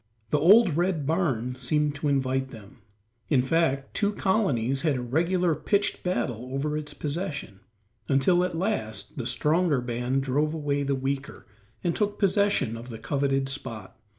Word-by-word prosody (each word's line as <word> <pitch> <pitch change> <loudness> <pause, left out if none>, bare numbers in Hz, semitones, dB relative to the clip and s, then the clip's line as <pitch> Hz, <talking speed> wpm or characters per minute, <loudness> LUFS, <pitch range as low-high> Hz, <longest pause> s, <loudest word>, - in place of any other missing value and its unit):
The 150 - +3
old 185 0 +6
red 175 -4 0
barn 135 -7 0
seemed 145 +4 0
to 145 +1 -3
invite 130 -1 0
them; 115 +2 -13 0.5
in 130 -5 +3
fact, 135 -2 0
two 205 0 +1
colonies 140 - +1
had 155 -4 +1
a 125 - -2
regular 170 +7 +1
pitched 200 +6 0
battle 125 -8 -2
over 150 +2 -1
its 150 -1 -5
possession, 150 - -4 0.5
until 145 +6 +3
at 180 -2 -2
last 170 - -3
the - - -2
stronger 155 -2 +2
band 125 +2 -1
drove 145 +4 0
away 145 -2 -1
the 140 0 0
weaker, 135 +1 -4 0.4
and 175 -2 0
took 210 -1 -1
possession 200 - +2
of 115 +2 -9
the 115 - -6
coveted 135 +3 0
spot. 115 -8 -6
145 Hz, 155 wpm, -26 LUFS, 130-170 Hz, 0.5 s, old